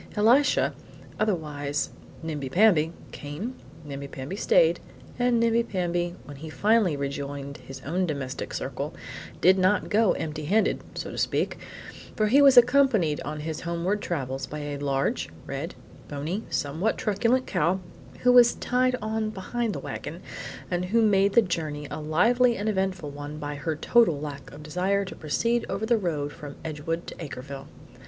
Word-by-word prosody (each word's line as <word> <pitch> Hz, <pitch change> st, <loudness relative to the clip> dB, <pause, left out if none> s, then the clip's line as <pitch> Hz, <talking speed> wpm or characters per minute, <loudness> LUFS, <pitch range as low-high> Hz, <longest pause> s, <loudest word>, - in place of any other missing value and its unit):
Elisha, 240 Hz, +7 st, +4 dB, 0.5 s
otherwise 150 Hz, -8 st, -1 dB, 0.3 s
Nimbi 150 Hz, -4 st, -3 dB
Pamby, 175 Hz, -5 st, +4 dB, 0.2 s
came; 150 Hz, -, -5 dB, 0.3 s
Nimbi 140 Hz, -1 st, -6 dB
Pamby 135 Hz, +8 st, -6 dB
stayed; -, -, +4 dB, 0.4 s
and 245 Hz, -1 st, +3 dB
Nimbi 230 Hz, 0 st, +3 dB
Pamby, 175 Hz, -5 st, -1 dB
when 145 Hz, -1 st, -10 dB
he 160 Hz, +3 st, -8 dB
finally 205 Hz, -3 st, +2 dB
rejoined 140 Hz, 0 st, -4 dB
his 135 Hz, -1 st, -10 dB
own 180 Hz, +5 st, 0 dB
domestic 140 Hz, -4 st, -4 dB
circle, -, -, -4 dB, 0.5 s
did 185 Hz, +2 st, +6 dB
not 185 Hz, +3 st, +2 dB
go 215 Hz, -1 st, +4 dB
empty 155 Hz, -1 st, -4 dB
handed 210 Hz, +8 st, +2 dB, 0.2 s
(so -, -, -4 dB
to -, -, -5 dB
speak), -, -, 0 dB, 0.6 s
for 215 Hz, -, +2 dB
he 275 Hz, +5 st, +6 dB
was 275 Hz, -2 st, +7 dB
accompanied 240 Hz, -, +5 dB
on 150 Hz, 0 st, -5 dB
his 160 Hz, 0 st, -4 dB
homeward 170 Hz, +5 st, -1 dB
travels 135 Hz, -5 st, -3 dB
by 150 Hz, -, -6 dB
a 145 Hz, -1 st, -4 dB
large, 140 Hz, -1 st, 0 dB, 0.2 s
red, -, -, -5 dB, 0.3 s
bony, 155 Hz, +9 st, -3 dB
somewhat 160 Hz, +10 st, -1 dB
truculent 230 Hz, +5 st, +1 dB
cow, 180 Hz, +1 st, +1 dB, 0.4 s
who 250 Hz, -, +5 dB
was 245 Hz, -1 st, +7 dB
tied 255 Hz, 0 st, +1 dB
on 220 Hz, 0 st, -1 dB
behind 220 Hz, +3 st, -2 dB
the -, -, -4 dB
wagon, -, -, -6 dB, 0.5 s
and 180 Hz, 0 st, 0 dB
who 225 Hz, +5 st, +3 dB
made 200 Hz, -2 st, +4 dB
the 235 Hz, -, +6 dB
journey 155 Hz, -5 st, -3 dB
a -, -, -4 dB
lively 235 Hz, +11 st, +3 dB
and 205 Hz, -, -3 dB
eventful 190 Hz, -6 st, -1 dB
one 145 Hz, +1 st, -7 dB
by 145 Hz, -1 st, -4 dB
her 155 Hz, +2 st, -3 dB
total 170 Hz, -2 st, +3 dB
lack 145 Hz, -2 st, -7 dB
of 150 Hz, +1 st, -11 dB
desire 185 Hz, +6 st, 0 dB
to 185 Hz, -, -8 dB
proceed 230 Hz, +10 st, 0 dB
over 195 Hz, +3 st, -2 dB
the 235 Hz, +1 st, +3 dB
road 150 Hz, -6 st, -2 dB
from 145 Hz, -1 st, -9 dB
Edgewood 160 Hz, +2 st, -3 dB
to -, -, -7 dB
Acreville. 140 Hz, -3 st, -7 dB
175 Hz, 160 wpm, -26 LUFS, 145-220 Hz, 0.6 s, was